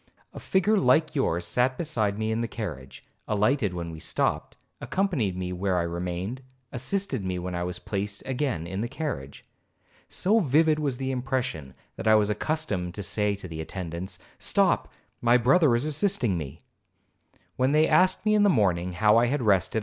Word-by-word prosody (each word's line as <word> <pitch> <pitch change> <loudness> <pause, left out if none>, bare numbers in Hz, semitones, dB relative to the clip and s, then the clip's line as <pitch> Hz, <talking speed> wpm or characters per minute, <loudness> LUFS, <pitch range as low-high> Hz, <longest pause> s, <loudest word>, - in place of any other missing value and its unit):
A - - -8
figure 200 +3 +2
like 155 +4 +3
yours 85 - 0
sat 125 +6 +1
beside 110 -11 -1
me 110 0 -1
in 110 +1 -1
the 115 - -1
carriage, 75 - -7 0.2
alighted 105 -1 +1
when 85 -1 -4
we 80 - -9
stopped, - - -1 0.2
accompanied 155 - -1
me 90 0 -3
where 95 0 0
I 85 - +1
remained, 90 +7 -4 0.3
assisted 130 - -2
me 95 -1 -2
when 90 +1 -4
I 90 - -2
was 90 0 -4
placed 100 +2 -4
again 130 - -2
in 95 +3 -4
the 120 - -1
carriage. 120 - -5 0.6
So 215 +5 +2
vivid 155 - +3
was 140 -5 -1
the 135 0 -2
impression, 125 - -3 0.2
that - - -4
I 110 - +7
was 105 -1 +3
accustomed 105 - -2
to 100 - -4
say 105 +1 +1
to 95 -2 -9
the 80 -2 -6
attendants, 90 +2 -6 0.2
'Stop, - - +1 0.3
my 120 +1 +5
brother 135 +2 +4
is 120 +4 0
assisting 155 - +1
me.' 75 -2 -6 0.9
When 130 +2 +2
they 155 +1 +4
asked 185 +3 +3
me 215 - +3
in 210 - +4
the 205 - +5
morning 90 - +1
how 105 +4 +4
I 120 +1 +4
had 135 +1 -1
rested? 100 +1 +2
110 Hz, 180 wpm, -26 LUFS, 90-140 Hz, 0.9 s, I